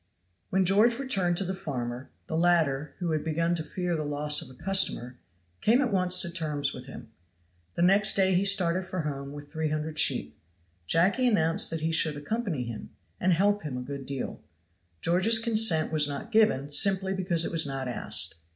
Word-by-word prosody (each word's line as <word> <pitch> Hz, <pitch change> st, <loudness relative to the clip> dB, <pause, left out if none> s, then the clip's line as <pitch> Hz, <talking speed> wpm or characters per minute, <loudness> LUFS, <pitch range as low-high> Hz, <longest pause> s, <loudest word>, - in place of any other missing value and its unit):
When 190 Hz, 0 st, +1 dB
George 215 Hz, +6 st, +4 dB
returned 195 Hz, -10 st, 0 dB
to 195 Hz, -, 0 dB
the 190 Hz, 0 st, -3 dB
farmer, 125 Hz, -7 st, -6 dB, 0.2 s
the 160 Hz, -, -5 dB
latter, 160 Hz, -4 st, +1 dB
who 175 Hz, -3 st, -3 dB
had 155 Hz, -1 st, -1 dB
begun 165 Hz, +2 st, -1 dB
to 165 Hz, -2 st, -3 dB
fear 175 Hz, +3 st, -3 dB
the 155 Hz, -, -3 dB
loss 150 Hz, 0 st, 0 dB
of -, -, -10 dB
a 130 Hz, -, -14 dB
customer, 130 Hz, -10 st, +1 dB, 0.4 s
came 230 Hz, +4 st, +3 dB
at 260 Hz, -5 st, 0 dB
once 180 Hz, -1 st, +2 dB
to 170 Hz, -, -4 dB
terms 150 Hz, -5 st, -3 dB
with 125 Hz, +1 st, -10 dB
him. 120 Hz, -, -11 dB, 0.6 s
The 170 Hz, -, 0 dB
next 200 Hz, +3 st, +4 dB
day 190 Hz, -1 st, +2 dB
he 180 Hz, +2 st, +2 dB
started 190 Hz, -3 st, +3 dB
for 185 Hz, -1 st, -4 dB
home 140 Hz, -2 st, -5 dB
with 145 Hz, 0 st, -11 dB
three 160 Hz, -1 st, -2 dB
hundred 155 Hz, 0 st, -3 dB
sheep. 75 Hz, -, 0 dB, 0.5 s
Jacky 200 Hz, +10 st, +2 dB
announced 165 Hz, -8 st, +1 dB
that 165 Hz, -1 st, -5 dB
he 160 Hz, +1 st, -1 dB
should 160 Hz, -2 st, +2 dB
accompany 175 Hz, -, -3 dB
him, 115 Hz, -3 st, -8 dB, 0.3 s
and 185 Hz, -, +1 dB
help 205 Hz, +4 st, +1 dB
him 140 Hz, -5 st, -6 dB
a -, -, -5 dB
good 140 Hz, 0 st, -8 dB
deal. 135 Hz, -2 st, -6 dB, 0.6 s
George's 185 Hz, +7 st, +3 dB
consent 220 Hz, -9 st, +4 dB
was 150 Hz, -2 st, +3 dB
not 145 Hz, +11 st, -7 dB
given, 180 Hz, -, +2 dB
simply 190 Hz, +4 st, +3 dB
because 175 Hz, -3 st, -1 dB
it -, -, -4 dB
was 160 Hz, -3 st, +2 dB
not 135 Hz, -1 st, -4 dB
asked. 120 Hz, -7 st, -1 dB
165 Hz, 195 wpm, -27 LUFS, 145-190 Hz, 0.6 s, George